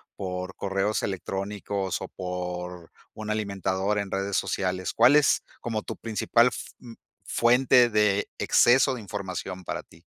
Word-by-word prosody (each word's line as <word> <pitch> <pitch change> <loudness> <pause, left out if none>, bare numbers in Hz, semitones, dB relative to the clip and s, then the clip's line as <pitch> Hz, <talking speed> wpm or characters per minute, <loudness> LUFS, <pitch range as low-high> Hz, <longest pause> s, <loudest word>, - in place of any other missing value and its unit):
por 90 -1 -5
correos 100 +2 -1
electrónicos 100 0 -3
o - - -4
por, 90 -1 -6 0.2
un 110 0 -7
alimentador 100 -1 -1
en 100 -1 -3
redes 100 0 -1
sociales? 95 -1 -1
¿Cuál 120 +5 +6
es 150 - +3 0.2
como 110 -2 -3
tu - - -6
principal 115 +1 +2
f - - -3 0.2
n 115 -2 -11 0.4
fuente 125 +1 +5
de 105 -1 +2
exceso 130 +2 +4
de 120 - -7
información 95 -3 -5
para - - -4
ti? - - -20
100 Hz, 140 wpm, -26 LUFS, 95-110 Hz, 0.4 s, Cuál